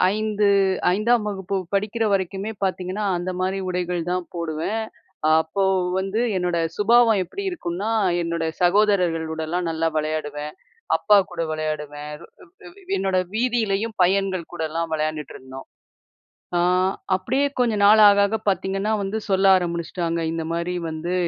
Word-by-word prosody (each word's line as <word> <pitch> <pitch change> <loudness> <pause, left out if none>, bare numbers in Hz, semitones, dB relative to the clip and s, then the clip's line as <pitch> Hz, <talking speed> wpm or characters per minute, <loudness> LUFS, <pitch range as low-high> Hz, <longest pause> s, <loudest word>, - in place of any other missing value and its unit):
ஐந்து 215 -1 0 0.5
ஐந்தாம் 215 +3 +2
வகுப்பு 195 -1 -3 0.2
படிக்கிற 215 +3 0
வரைக்குமே 195 +3 -2
பாத்தீங்கன்னா, 185 +2 -2
அந்த 180 +1 -3
மாரி 190 +1 -1
உடைகள் 180 -1 -2
தான் 180 -1 -1
போடுவேன். 170 +7 -2 0.6
அப்போ 175 +5 -2 0.4
வந்து 195 +4 -2 0.2
என்னோட 180 -1 0 0.2
சுபாவம் 225 0 +4
எப்டி 400 - -7
இருக்கும்ன்னா, 205 - -3 0.3
என்னோட 170 -1 -2 0.2
சகோதரர்களோடலாம் 175 -4 +1
நல்லா 165 0 0
வெளையாடுவேன். 150 -1 -3 0.4
அப்பா 210 - +4 0.2
கூட 170 -1 -4
வெளையாடுவேன். 150 -1 -4 0.6
வ் - - -15
வ் 385 -1 -12
என்னோட 190 -1 0 0.2
வீதியிலேயும் 225 -2 0
பையன்கள் 190 -2 0
கூடலாம் 165 0 -3
வெளையாண்டுட்ருந்தோம். 150 -4 -5 0.9
ஆ - - +2 0.6
அப்டியே 260 +10 0
கொஞ்ச 240 -3 +2
நாள் 215 +2 +7
ஆக, 200 0 +4
ஆக 205 +2 -1
பாத்தீங்கன்னா 195 +2 -1
வந்து, 195 +3 -2
சொல்ல 195 0 +2
ஆரம்பிடுச்சுட்டாங்க. 170 -1 -2
"இந்த 165 0 -3
மாரி 170 +2 -2
வந்து 160 +3 -4
185 Hz, 125 wpm, -23 LUFS, 165-205 Hz, 0.9 s, நாள்